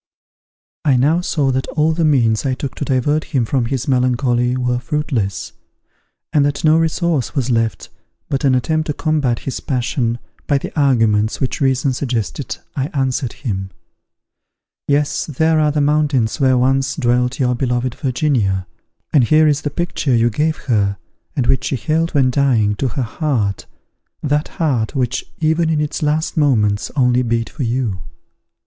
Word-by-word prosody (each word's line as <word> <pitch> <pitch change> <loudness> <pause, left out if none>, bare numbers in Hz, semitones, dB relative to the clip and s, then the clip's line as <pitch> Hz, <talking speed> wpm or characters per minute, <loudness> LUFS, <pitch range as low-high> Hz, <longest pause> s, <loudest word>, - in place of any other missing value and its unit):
I 140 -5 +3
now 150 +7 +3
saw 145 -6 0
that 130 0 -1
all 155 +1 +1
the 165 +1 0
means 120 -8 +2
I 130 -2 0
took 135 0 -5
to 145 - -4
divert 145 +4 +1
him 130 -6 -1
from 125 +1 0
his 130 +1 -3
melancholy 125 -1 +1
were 125 -1 0
fruitless, 125 - -2 0.8
and 150 -3 +4
that 145 0 -1
no 155 0 +5
resource 165 -3 0
was 130 -3 0
left 115 -2 -1 0.4
but 135 0 -2
an 135 -2 +4
attempt 155 +5 0
to 150 - -1
combat 145 -6 0
his 135 - -3
passion 125 -2 -1 0.3
by 145 - +3
the - - -6
arguments 115 -7 +2
which 130 +2 -2
reason 135 0 +2
suggested 120 -7 -3 0.2
I 135 0 -1
answered 130 -2 -1
him, 95 -7 -4 1.2
"Yes, 145 0 0
there 160 +2 +2
are 150 -1 +3
the 150 0 0
mountains 145 -5 +1
where 130 -2 +3
once 135 +2 +1
dwelt 125 0 0
your 125 -2 +2
beloved 125 -1 -1
Virginia; 125 - 0 0.5
and 140 -5 +5
here 155 +5 +4
is 145 -1 +2
the 145 - -2
picture 150 -4 -1
you 115 +1 +3
gave 155 +7 0
her, 100 -6 +1 0.4
and 130 - 0
which 130 - +1
she - - -1
held, 160 +5 -1
when 130 -3 +3
dying, 120 -6 +2
to 135 - 0
her 130 +2 -2
heart 115 - -2 0.6
that 150 +1 0
heart, 130 -9 0
which 130 -1 -1
even 160 +1 +1
in 160 -2 +1
its 150 +2 -2
last 155 +3 0
moments 105 -9 +2
only 125 -2 +3
beat 115 -1 -1
for 155 - -7
you." 120 -5 -1
135 Hz, 165 wpm, -18 LUFS, 120-150 Hz, 1.2 s, no